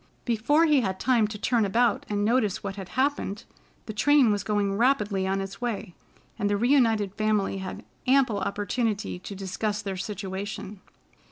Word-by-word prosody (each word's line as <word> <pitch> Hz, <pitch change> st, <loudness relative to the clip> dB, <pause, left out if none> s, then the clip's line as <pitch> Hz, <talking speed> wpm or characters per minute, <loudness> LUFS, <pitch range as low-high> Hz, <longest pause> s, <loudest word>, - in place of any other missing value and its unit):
Before 245 Hz, +8 st, +3 dB
he 300 Hz, -4 st, +4 dB
had 190 Hz, -4 st, -2 dB
time 240 Hz, -4 st, +3 dB
to 210 Hz, 0 st, -6 dB
turn 235 Hz, +2 st, +1 dB
about 225 Hz, +3 st, +1 dB
and 205 Hz, 0 st, 0 dB
notice 220 Hz, -4 st, +1 dB
what 195 Hz, -1 st, -4 dB
had 195 Hz, -2 st, -8 dB
happened, 260 Hz, -6 st, 0 dB, 0.4 s
the 215 Hz, -, -6 dB
train 260 Hz, +2 st, +4 dB
was 205 Hz, -1 st, -1 dB
going 205 Hz, -2 st, 0 dB
rapidly 210 Hz, -5 st, +1 dB
on 195 Hz, +1 st, 0 dB
its 195 Hz, +3 st, -7 dB
way, 215 Hz, -6 st, -3 dB, 0.5 s
and 205 Hz, -2 st, +1 dB
the 205 Hz, -, +1 dB
reunited 225 Hz, -5 st, +3 dB
family 210 Hz, -2 st, 0 dB
had 190 Hz, -, -7 dB, 0.2 s
ample 255 Hz, -6 st, +3 dB
opportunity 205 Hz, +1 st, -2 dB
to 195 Hz, +2 st, -8 dB
discuss 205 Hz, +3 st, -3 dB
their 195 Hz, -2 st, -4 dB
situation. 195 Hz, 0 st, -5 dB
210 Hz, 165 wpm, -26 LUFS, 195-235 Hz, 0.5 s, he